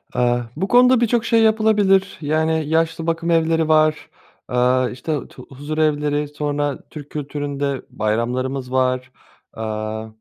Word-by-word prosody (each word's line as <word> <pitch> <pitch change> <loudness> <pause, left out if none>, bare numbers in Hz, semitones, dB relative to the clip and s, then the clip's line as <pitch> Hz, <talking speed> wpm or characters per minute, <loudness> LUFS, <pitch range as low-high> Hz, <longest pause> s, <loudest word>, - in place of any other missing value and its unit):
Eee, 120 0 +1
bu 185 +6 -2
konuda 250 +1 +5
birçok 235 0 +1
şey 230 -1 +3
yapılabilir. 210 -3 +3
Yani, 160 +1 0
yaşlı 165 0 0
bakım 165 +1 -1
evleri 165 -1 +2
var, 155 -1 +2 0.4
aaa, 125 +1 +2
işte 145 +3 -4
tu 125 - -13
huzurevleri, 150 +1 -1
sonra 145 -1 -2
Türk 150 -2 -10
kültüründe 145 -2 -3
bayramlarımız 125 +4 -2
var. 130 0 0 0.4
Aaa, 110 0 -4
150 Hz, 125 wpm, -20 LUFS, 130-165 Hz, 0.4 s, konuda